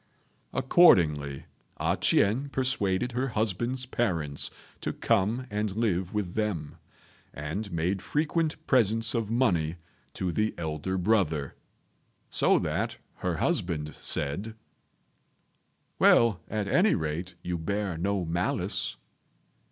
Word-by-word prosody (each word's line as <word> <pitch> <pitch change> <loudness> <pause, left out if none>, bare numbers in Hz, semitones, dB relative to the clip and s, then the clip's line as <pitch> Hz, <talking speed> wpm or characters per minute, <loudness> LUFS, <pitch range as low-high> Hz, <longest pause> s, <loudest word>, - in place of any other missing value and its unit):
Accordingly, 80 - +4 0.3
A - - +1
ch'ien 125 +8 +2
persuaded 125 -4 0
her 125 +3 -1
husband's 120 +3 -1
parents 85 - -1 0.3
to - - -3
come 115 +3 +1
and 105 -1 -2
live 95 -5 0
with 105 -5 -2
them, 95 -9 -2 0.6
and 80 +8 -4
made 90 +4 -1
frequent 155 - 0
presents 115 -2 +3
of 115 -4 -1
money 90 -10 +1 0.4
to 90 -2 -1
the 105 +5 0
elder 80 +3 -3
brother; 85 -8 +1 0.8
so - - +4
that - - -2 0.2
her - - -2
husband 75 -3 -1
said, 95 +11 -1 1.4
"Well, 115 -7 +5
at 105 -1 -2
any 190 - +4
rate, 85 +3 -3
you 90 -1 -2
bear 100 +1 -2
no 95 +2 -1
malice." 85 +2 -1
100 Hz, 110 wpm, -28 LUFS, 85-115 Hz, 1.4 s, Well